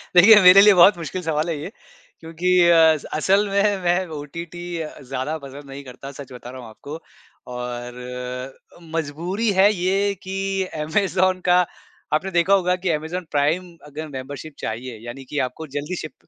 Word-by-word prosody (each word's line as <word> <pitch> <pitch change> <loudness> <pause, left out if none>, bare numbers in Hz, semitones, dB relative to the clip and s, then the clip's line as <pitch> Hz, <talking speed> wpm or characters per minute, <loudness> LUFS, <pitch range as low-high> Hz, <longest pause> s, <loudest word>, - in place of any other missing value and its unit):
देखिए, 195 +5 +9
मेरे 185 +2 +9
लिए 210 0 +7
बहुत 180 +1 +6
मुश्किल 170 +2 -5
सवाल 160 0 -1
है 165 - -2
ये 165 +7 -7 0.5
क्योंकि 165 +2 -3 0.2
अ, 160 -1 +6 0.2
असल 195 +7 +2
में 200 +1 +2
मैं 175 +2 +1
ओटीटी 170 +4 -8 0.2
अ, 155 - -8
ज़्यादा 135 +4 -4
पसंद 140 +1 -10
नहीं 140 +1 -8
करता, 130 +2 -10
सच 140 -1 -11
बता 125 0 -10
रहा 130 +1 -9
हूँ 115 - -11
आपको 145 +8 -9 0.5
और 125 +1 -6 0.4
मजबूरी 170 +8 -2
है 200 +2 +6
ये 195 +2 0
कि 195 0 -2 0.2
अमेज़न 185 +2 +1
का 180 0 +5 0.5
आपने 185 +5 0
देखा 175 +2 +3
होगा 180 -2 +3
कि - - +2
अमेज़न 160 +3 -3
प्राइम 165 +5 0
अगर 150 +2 -7
मेंबरशिप 140 +2 -8
चाहिए, 115 +2 -5
यानी 120 +3 -8
कि 145 - -2
आपको 155 +6 -10
जल्दी 150 +5 -4
शिप 155 - -8
160 Hz, 165 wpm, -22 LUFS, 135-185 Hz, 0.5 s, देखिए